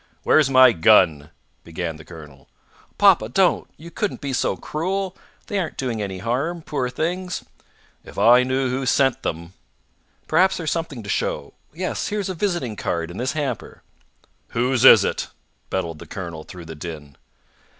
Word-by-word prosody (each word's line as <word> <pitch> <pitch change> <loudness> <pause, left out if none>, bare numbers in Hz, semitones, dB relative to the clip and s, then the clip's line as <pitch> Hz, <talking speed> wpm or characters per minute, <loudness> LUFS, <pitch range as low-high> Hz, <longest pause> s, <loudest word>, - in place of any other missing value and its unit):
"Where's 155 -3 +4
my 130 -1 +7
gun?" 80 -6 +4 0.3
began 80 -1 -5
the 80 - -12
colonel. 75 -5 -13 0.5
"Papa, 110 - +5
don't! 180 +8 +2
You 170 +2 -11
couldn't 205 +4 -3
be 140 -2 -4
so 130 0 0
cruel! 190 +4 -3 0.3
They 205 - -2
aren't 170 -4 -4
doing 120 -5 -2
any 95 -2 -4
harm, 140 - -2
poor 135 -5 -2
things!" 180 +7 -3 0.6
"If - - -13
I 120 +2 +6
knew 130 0 0
who 130 0 -2
sent 135 -1 +2
them 85 +2 -5 0.4
" - - -41
"Perhaps 185 +4 +3
there's 160 -4 -2
something 160 -8 -4
to 100 - -9
show. - - -2 0.2
Yes; 180 +4 -3
here's 205 -2 -2
a - - -2
visiting 175 - -2
card 85 -3 -3
in 90 - -9
this 130 +2 -1
hamper." 145 -3 -4 0.6
"Whose 125 +1 0
is - - +9
it?" - - -2 0.4
bellowed 85 -4 -3
the - - -11
colonel 85 -5 -7
through 90 -2 -10
the 80 - -8
din. 75 -3 -8
125 Hz, 165 wpm, -22 LUFS, -, 0.6 s, is